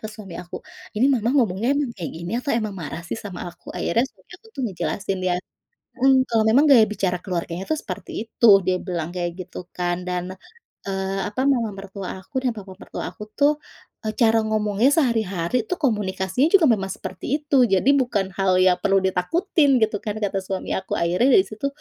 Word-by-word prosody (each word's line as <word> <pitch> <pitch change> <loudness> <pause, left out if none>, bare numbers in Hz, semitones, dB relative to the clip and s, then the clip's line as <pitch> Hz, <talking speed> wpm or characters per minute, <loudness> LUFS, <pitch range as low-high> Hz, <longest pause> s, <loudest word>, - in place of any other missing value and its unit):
ke 215 - -6
suami 215 -5 -10
aku, 180 - -8 0.4
“Ini 225 - +3
Mama 235 -3 +1
ngomongnya 225 -3 +1
emang 280 -5 -1
kayak 175 -7 -6
gini, 170 +3 -6
atau 280 - -3
emang 215 -3 -2
marah 160 +2 -6
sih 180 - -4
sama 195 -4 -7
aku?” - - -18
Akhirnya 230 +8 +1
suami 190 -6 -29
aku - - -20
tuh - - -3
ngejelasin. 195 0 -2
Dia 180 -1 +1 0.7
mhm. 265 -1 +5
Kalau 225 -2 +2
memang 235 +7 +5
gaya 245 -6 +8
bicara 195 -4 -1
keluarganya 175 -1 -3
tuh 310 - 0
seperti 225 +1 -6
itu. 235 - +2
Dia 185 0 0
bilang 175 -3 -4
kayak 175 -1 -2 0.2
gitu, 180 - -8
kan. 175 0 -2
Dan, 180 +1 -4 0.5
eee, 195 0 -2
apa, 210 - -4
Mama 235 -6 +2
mertua 195 -1 -7
aku 190 - -13
dan 250 - +2
Papa 195 -2 -9
mertua - - -6
aku 210 - -9
tuh, 285 +1 +5 0.5
eee, 215 - 0
cara 225 -1 +5
ngomongnya 215 +3 +2
sehari-hari 225 - +1
tuh, 365 - -1
komunikasinya 210 - +1
juga 365 -5 +7
memang 195 -2 -4
seperti - - -7 0.2
itu. 285 -3 +3
Jadi 195 +5 +3
bukan 205 -7 -1
hal 190 -1 +3
yang 185 -1 +5
perlu 195 0 +3
ditakutin, 275 - +2
gitu 215 -1 +2
kan, 210 -1 -3
kata 195 -1 0
suami 190 0 -4
aku. 190 - -6
Akhirnya 180 +9 +2
dari 190 - +4
situ, 215 +7 -5
205 Hz, 195 wpm, -23 LUFS, 185-235 Hz, 0.7 s, gaya